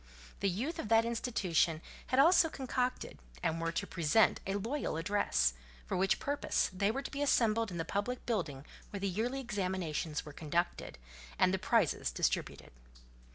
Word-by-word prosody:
The 200 - +1
youth 250 - -3
of - - -3
that 225 0 +5
institution 190 -9 +1 0.3
had 255 - 0
also 325 +3 +6
concocted, 255 -2 -2 0.2
and 165 +1 0
were 165 0 0
to 200 - -1
present 170 +4 +3
a 195 - -1
loyal 225 - -2
address; 165 - +1 0.3
for - - -3
which 190 +1 +2
purpose 285 -6 0
they 200 +2 +1
were 270 +5 -2
to - - -6
be 280 - -4
assembled 230 -5 +2
in 175 - -6
the 165 - -2
public 205 +8 -3
building 150 - -2 0.2
where 200 - -5
the 200 - -1
yearly 230 +8 -1
examinations 185 - -2
were 150 - -9
conducted, 165 - -2 0.4
and 185 - +3
the 190 - 0
prizes 215 - +2
distributed. - - -2
200 Hz, 165 wpm, -33 LUFS, 170-240 Hz, 0.4 s, also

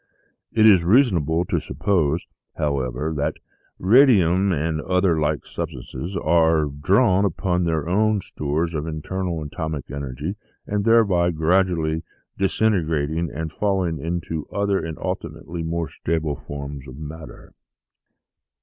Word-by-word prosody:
It 110 -1 +4
is 95 -6 +7
reasonable 85 - +3
to - - 0
suppose, 85 -5 0 0.3
however, 70 +1 -1
that 70 - -1 0.4
radium 100 - +5
and 80 -1 -1
the - - -6
other 90 -3 +2
like 75 -1 0
substances 80 +9 -5
are 80 -1 +3
drawing 95 - +2
upon 90 -1 0
their 80 -2 -1
own 105 +3 +2
stores 80 +2 -2
of 80 0 -3
internal 85 +1 -3
atomic 80 -1 -5
energy, 70 - -4 0.3
and 105 0 -1
thereby 100 -7 +4
gradually 80 -1 +1 0.3
dis 95 -1 -1
integrating 80 -5 +1
and 80 +2 -5
falling 95 -5 0
into 80 0 -3
other 100 -1 0
and 80 -1 -5
ultimately 85 +3 -5
more 80 0 -2
stable 80 -2 -2
forms 70 -1 -7
of 65 0 -10
matter." 80 +1 -10
80 Hz, 125 wpm, -23 LUFS, 75-95 Hz, 0.4 s, is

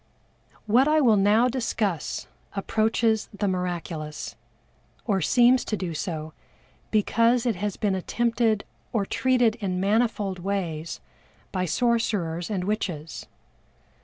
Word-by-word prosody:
What 240 +6 +4
I 310 +1 +4
will 240 -7 +5
now 210 +4 +4
discuss 220 - -2 0.3
approaches 220 +2 +1
the 205 0 -2
miraculous, 175 -4 -3 0.7
or 200 -4 +1
seems 245 +8 +4
to 215 - -2
do 180 -4 -3
so 155 -2 -4 0.6
because 230 +3 +2
it 230 -6 +1
has 205 +1 -3
been 205 -2 +1
attempted 230 +2 0 0.3
or 210 -4 +1
treated 245 0 +2
in 190 -5 -2
manifold 205 -2 +1
ways 175 -4 -3 0.5
by 185 -1 -1
sorcerers 185 -5 0
and 195 -4 -1
witches. 180 -7 -3
205 Hz, 115 wpm, -25 LUFS, 180-230 Hz, 0.7 s, will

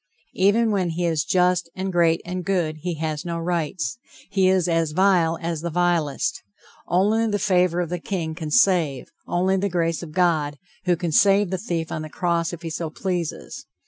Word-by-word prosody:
Even 215 +4 +3
when 190 -4 0
he 170 +2 -2
is 160 -3 +1
just 180 -1 +2
and 190 0 -3
great 165 -1 +3
and 180 +1 -4
good, 175 -5 -1
he 175 +2 -4
has 155 -1 -3
no 170 -1 -3
rights, 170 +4 -2 0.3
he 190 -2 +3
is 185 -2 +2
as 165 -2 0
vile 175 -3 +3
as 165 -2 -3
the 170 - -3
vilest. 170 -4 0 0.5
Only 210 +6 +2
the 205 -1 0
favor 180 -3 +2
of 170 - -3
the 180 0 -3
king 165 -3 -3
can 160 -2 -6
save, 165 - +2 0.2
only 185 +2 +1
the 200 +1 0
grace 165 -2 0
of 170 -3 -8
God, 155 -4 +1 0.3
who 180 -1 +3
can 170 -1 -3
save 195 +3 +4
the 190 - -1
thief 170 -5 -3
on 155 - -3
the 155 - -7
cross 170 0 -1
if 175 -1 -8
he 165 - -4
so 160 0 -3
pleases. 175 -1 -4
175 Hz, 195 wpm, -23 LUFS, 165-185 Hz, 0.5 s, save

